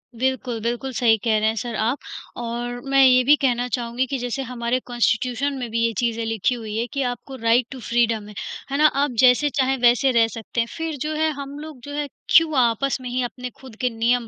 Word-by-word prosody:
बिल्कुल, 255 Hz, -1 st, -1 dB
बिल्कुल, 240 Hz, +4 st, -2 dB
सही 225 Hz, -1 st, +3 dB
कह 220 Hz, -2 st, +2 dB
रहे 215 Hz, -, +1 dB
हैं 220 Hz, -, -2 dB
सर 230 Hz, +1 st, -4 dB
आप 230 Hz, +6 st, 0 dB, 0.4 s
और 240 Hz, +1 st, -4 dB
मैं 275 Hz, 0 st, +5 dB
ये 255 Hz, -1 st, +6 dB
भी 290 Hz, +4 st, +6 dB
कहना 245 Hz, -4 st, 0 dB
चाहूँगी 245 Hz, 0 st, -1 dB
कि 275 Hz, -, -2 dB
जैसे 245 Hz, +2 st, -3 dB
हमारे 245 Hz, 0 st, -2 dB
कांस्टीट्यूशन 245 Hz, +3 st, 0 dB
में 245 Hz, -2 st, -4 dB
भी 230 Hz, -, 0 dB
ये 230 Hz, -, +1 dB
चीज़ें 230 Hz, -1 st, 0 dB
लिखी 225 Hz, +2 st, 0 dB
हुई 220 Hz, -3 st, -6 dB
है 230 Hz, -, 0 dB
कि 275 Hz, -, -1 dB
आपको 250 Hz, +2 st, -5 dB
राइट 230 Hz, 0 st, +2 dB
टू 265 Hz, -, -7 dB
फ्रीडम 230 Hz, -2 st, 0 dB
है, 210 Hz, -, -11 dB, 0.4 s
है 275 Hz, -, 0 dB
ना 305 Hz, -, +4 dB
आप 285 Hz, -1 st, 0 dB
जैसे 255 Hz, +3 st, +5 dB
चाहें 265 Hz, -1 st, +1 dB
वैसे 245 Hz, +2 st, +4 dB
रह 230 Hz, -2 st, +4 dB
सकते 225 Hz, +1 st, -6 dB
हैं। 230 Hz, -, -2 dB
फिर 325 Hz, -2 st, -3 dB
जो 305 Hz, +1 st, -2 dB
है 315 Hz, +1 st, +1 dB
हम 280 Hz, +1 st, -8 dB
लोग 305 Hz, -3 st, -9 dB
जो 285 Hz, -, -8 dB
है 295 Hz, 0 st, -2 dB, 0.3 s
क्यों 320 Hz, -2 st, +6 dB
आपस 255 Hz, +2 st, +2 dB
में 250 Hz, -, -5 dB
ही 250 Hz, +1 st, -1 dB
अपने 250 Hz, +2 st, -5 dB
खुद 260 Hz, -4 st, -12 dB
के 250 Hz, -, +2 dB
नियम 235 Hz, +1 st, 0 dB
245 Hz, 230 wpm, -22 LUFS, 235-270 Hz, 0.4 s, ये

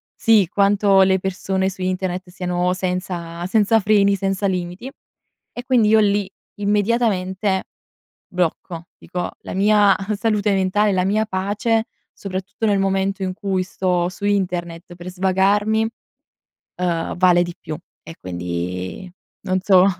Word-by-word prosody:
Sì, 215 Hz, -5 st, +4 dB
quanto 200 Hz, -1 st, +4 dB
le 190 Hz, 0 st, +3 dB
persone 190 Hz, 0 st, -1 dB
su 190 Hz, -1 st, -10 dB
internet 185 Hz, 0 st, -2 dB
siano 180 Hz, -1 st, -1 dB
senza 180 Hz, -2 st, -4 dB
senza 220 Hz, +2 st, +3 dB
freni, 200 Hz, -1 st, +3 dB
senza 195 Hz, 0 st, -1 dB
limiti. 180 Hz, +6 st, -4 dB, 0.6 s
E 245 Hz, -, -7 dB
quindi 245 Hz, -4 st, +3 dB
io 220 Hz, +1 st, +5 dB
lì 205 Hz, -2 st, +1 dB, 0.3 s
immediatamente, 200 Hz, -2 st, 0 dB, 0.7 s
blocco, 170 Hz, -1 st, -3 dB
dico 180 Hz, -1 st, -5 dB
la -, -, -7 dB
mia 205 Hz, 0 st, +4 dB, 0.2 s
salute 210 Hz, -2 st, +1 dB
mentale, 195 Hz, +2 st, +2 dB
la 185 Hz, -1 st, +1 dB
mia 215 Hz, +3 st, +1 dB
pace, 210 Hz, +3 st, 0 dB, 0.3 s
soprattutto 195 Hz, +3 st, -5 dB
nel 205 Hz, -2 st, +2 dB
momento 195 Hz, 0 st, 0 dB
in 185 Hz, -1 st, -2 dB
cui 190 Hz, -1 st, -1 dB
sto 180 Hz, -1 st, -1 dB
su 205 Hz, -, -7 dB
internet 175 Hz, -3 st, -2 dB
per 175 Hz, +1 st, -10 dB
svagarmi, 200 Hz, +4 st, +2 dB, 0.9 s
ehm, 170 Hz, -2 st, -2 dB
vale 175 Hz, -1 st, +4 dB
di 175 Hz, -1 st, -5 dB
più 155 Hz, -, -6 dB, 0.3 s
e 165 Hz, -, -11 dB
quindi 90 Hz, -, -5 dB, 0.3 s
non 185 Hz, 0 st, 0 dB
so. 190 Hz, -1 st, +5 dB
190 Hz, 130 wpm, -21 LUFS, 180-205 Hz, 0.9 s, io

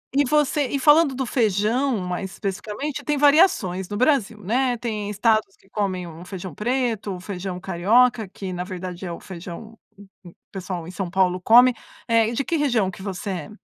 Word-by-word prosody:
E 285 Hz, +1 st, +4 dB
você 295 Hz, +1 st, +2 dB
E 280 Hz, -, -2 dB
falando 295 Hz, +1 st, +5 dB
do 265 Hz, +1 st, -2 dB
feijão 230 Hz, +3 st, +1 dB
mais 180 Hz, +1 st, -4 dB
especificamente 210 Hz, +9 st, -4 dB
tem 295 Hz, -, +1 dB
variações 280 Hz, -, +3 dB
no 205 Hz, -, -4 dB
Brasil, 235 Hz, -5 st, +1 dB
né. 245 Hz, +5 st, +1 dB
Tem 215 Hz, -4 st, -4 dB
estados 215 Hz, -1 st, +1 dB
que 195 Hz, -, -28 dB
comem 190 Hz, -4 st, -2 dB
o 165 Hz, +1 st, -10 dB
feijão 185 Hz, -3 st, -7 dB
preto, 225 Hz, -, -1 dB
o -, -, -8 dB
feijão 185 Hz, -1 st, -5 dB
carioca, 215 Hz, +6 st, +2 dB
que 190 Hz, 0 st, -7 dB
na 180 Hz, 0 st, -3 dB
verdade 185 Hz, -1 st, -7 dB
é 175 Hz, -, -4 dB
o 170 Hz, -, -7 dB
feijão 185 Hz, +4 st, -9 dB, 0.2 s
o 200 Hz, -1 st, -15 dB
o 175 Hz, -2 st, -13 dB, 0.2 s
pessoal 180 Hz, -3 st, -5 dB
em -, -, -7 dB
São 185 Hz, -1 st, -4 dB
Paulo 185 Hz, -1 st, +2 dB
come, 245 Hz, +6 st, +7 dB, 0.3 s
eh, 230 Hz, -2 st, +3 dB
e -, -, -4 dB
de 275 Hz, -, -1 dB
que 335 Hz, -, -1 dB
região 245 Hz, -10 st, +1 dB
que 190 Hz, -, -10 dB
você 195 Hz, 0 st, -5 dB
é? 175 Hz, -3 st, -5 dB
205 Hz, 195 wpm, -23 LUFS, 185-250 Hz, 0.3 s, come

